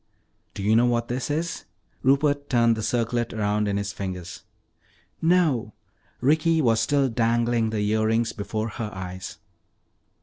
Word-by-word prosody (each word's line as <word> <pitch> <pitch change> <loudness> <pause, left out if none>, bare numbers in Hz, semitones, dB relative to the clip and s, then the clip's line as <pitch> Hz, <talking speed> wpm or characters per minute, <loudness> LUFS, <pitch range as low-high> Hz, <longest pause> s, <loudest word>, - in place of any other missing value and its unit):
"Do 100 - -5
you 105 +2 +3
know 120 +2 +4
what 120 -1 0
this 125 +1 -3
is?" 165 +3 -2 0.4
Rupert 140 +1 +2
turned 115 -2 +3
the 110 - -4
circlet 120 +1 -1
around 105 -1 0
in 100 0 0
his 100 0 -3
fingers. 90 -4 -6 0.8
"No." 160 - +2 0.5
Ricky 160 +5 +3
was 115 -6 +3
still 135 +4 +2
dangling 115 -1 +1
the 105 -2 -1
earrings 110 +2 +1
before 110 +2 -3
her 110 -1 -5
eyes. 95 0 -7
115 Hz, 140 wpm, -25 LUFS, 105-130 Hz, 0.8 s, know